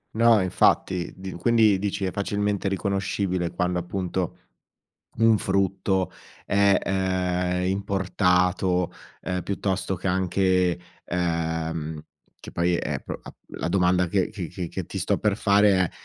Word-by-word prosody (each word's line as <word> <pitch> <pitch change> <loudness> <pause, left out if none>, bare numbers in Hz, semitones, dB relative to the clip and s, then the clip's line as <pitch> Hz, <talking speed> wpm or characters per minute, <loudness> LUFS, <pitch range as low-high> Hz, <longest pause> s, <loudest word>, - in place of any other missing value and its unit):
No 115 -2 +5
infatti, 90 0 +1
di 95 0 -7
quindi 110 +1 +3
dici 100 0 -2
è 95 - -1
facilmente 100 -1 -1
riconoscibile 95 -2 -1
quando 90 0 -1
appunto 90 0 -3 0.8
un 115 -2 +5
frutto 95 -1 0 0.3
è, 100 -1 +4
ehm, 90 -1 0
importato, 90 -2 +1 0.3
ehm, 90 -1 -2
piuttosto 95 -1 -2
che 90 - -6
anche, 90 -1 +2 0.3
ehm, 80 -2 -2 0.4
che - - -11
poi 85 +1 +1
è - - -3
pro - - -6 0.3
la 80 - -4
domanda 90 0 +2
che 95 +2 +1
che 90 -1 -5
che - - -5
ti - - -5
sto - - 0
per 105 -1 +1
fare 100 -4 +3
95 Hz, 125 wpm, -25 LUFS, 90-100 Hz, 0.8 s, No